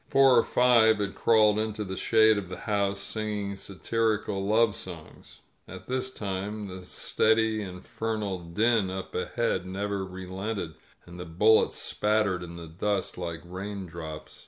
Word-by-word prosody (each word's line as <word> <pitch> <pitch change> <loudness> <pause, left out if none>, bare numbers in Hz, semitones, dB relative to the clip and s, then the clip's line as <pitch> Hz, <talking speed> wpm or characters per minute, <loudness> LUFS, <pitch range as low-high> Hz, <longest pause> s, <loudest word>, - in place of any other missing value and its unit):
Four 135 -3 +6
or - - +3
five 115 -3 +5
had 100 -1 -2
crawled 110 -2 +4
into 110 -1 -2
the 95 -1 -5
shade 110 0 +4
of 95 -3 -8
the 90 - -7
house, 100 -1 0
singing 105 -1 -3
satirical 105 0 -1
love 110 +1 +3
songs. 85 -5 -10 0.3
All - - -7
this 130 0 -1
time 100 0 -4
the 95 -1 -8
steady 110 +3 +1
infernal 105 +1 -4
din 100 +4 +1
up 95 0 -6
ahead 95 -1 -1
never 100 +1 -2
re 95 0 -8
lented, 95 -2 -4 0.3
and 85 0 -11
the 90 - -5
bullets 105 +7 +3
spattered 105 -4 0
in 85 -1 -8
the 85 -1 -8
dust 95 +5 -2
like 85 -2 -5
rain 95 +2 -6
drops. 80 -3 -8
100 Hz, 155 wpm, -28 LUFS, 95-110 Hz, 0.3 s, Four